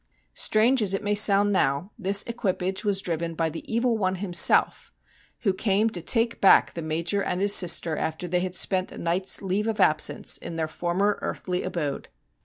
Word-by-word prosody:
Strange 235 Hz, +4 st, +1 dB
as 195 Hz, -2 st, +1 dB
it 195 Hz, -, -5 dB
may 205 Hz, 0 st, -1 dB
sound 205 Hz, 0 st, +4 dB
now, 145 Hz, +2 st, -1 dB
this 200 Hz, -2 st, +3 dB
equipage 190 Hz, -5 st, -4 dB
was 200 Hz, -2 st, -1 dB
driven 165 Hz, -1 st, -4 dB
by 160 Hz, -1 st, -2 dB
the 165 Hz, -, -8 dB
Evil 235 Hz, +1 st, 0 dB
One 185 Hz, -2 st, -1 dB
himself, 180 Hz, -2 st, +2 dB, 0.5 s
who 195 Hz, -4 st, 0 dB
came 205 Hz, +3 st, 0 dB
to 175 Hz, -, -3 dB
take 230 Hz, +6 st, 0 dB
back 195 Hz, -, +4 dB
the 170 Hz, -, -6 dB
Major 165 Hz, +5 st, -2 dB
and 180 Hz, -, -3 dB
his 200 Hz, +1 st, +3 dB
sister 170 Hz, -3 st, +4 dB
after 160 Hz, +3 st, -5 dB
they 180 Hz, +1 st, -1 dB
had 180 Hz, 0 st, -4 dB
spent 185 Hz, 0 st, 0 dB
a -, -, -11 dB
night's 180 Hz, +4 st, -1 dB
leave 195 Hz, +3 st, -2 dB
of 220 Hz, -1 st, -3 dB
absence 155 Hz, -5 st, +2 dB
in 170 Hz, -, -8 dB
their 160 Hz, -1 st, -3 dB
former 180 Hz, +6 st, -2 dB
earthly 180 Hz, -1 st, -4 dB
abode. 155 Hz, -6 st, -5 dB
190 Hz, 190 wpm, -24 LUFS, 170-205 Hz, 0.5 s, sound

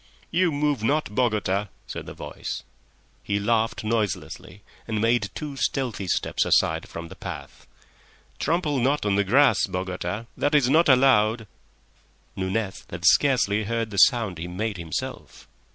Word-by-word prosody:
"You 175 Hz, 0 st, +2 dB
move 145 Hz, -4 st, 0 dB
not, 145 Hz, -2 st, 0 dB
Bogota," 105 Hz, -4 st, 0 dB, 0.2 s
said -, -, -7 dB
the -, -, -8 dB
voice. -, -, -6 dB, 0.6 s
He 100 Hz, 0 st, -1 dB
laughed 115 Hz, +3 st, 0 dB
noiselessly 95 Hz, -3 st, -3 dB, 0.2 s
and 110 Hz, -1 st, -1 dB
made 115 Hz, +2 st, +2 dB
two 150 Hz, -2 st, -5 dB
stealthy 125 Hz, -8 st, -2 dB
steps -, -, 0 dB
aside -, -, +2 dB
from 85 Hz, 0 st, -7 dB
the -, -, -10 dB
path. -, -, -9 dB, 0.7 s
"Trample 155 Hz, -3 st, 0 dB
not 135 Hz, +1 st, +1 dB
on 105 Hz, -, +2 dB
the 100 Hz, +1 st, +3 dB
grass, 120 Hz, +1 st, +4 dB
Bogota; 90 Hz, +3 st, -4 dB
that 145 Hz, +1 st, +1 dB
is 140 Hz, -4 st, +4 dB
not 160 Hz, +2 st, +4 dB
allowed." 115 Hz, -4 st, +4 dB, 0.9 s
Nunez 95 Hz, +1 st, -2 dB
had 85 Hz, 0 st, -6 dB
scarcely 110 Hz, -3 st, +3 dB
heard 115 Hz, 0 st, -2 dB
the 100 Hz, -, -6 dB
sound 115 Hz, -, +4 dB
he 85 Hz, -, -4 dB
made 100 Hz, +3 st, -3 dB
himself. 85 Hz, -3 st, -6 dB
110 Hz, 145 wpm, -25 LUFS, 100-135 Hz, 0.9 s, grass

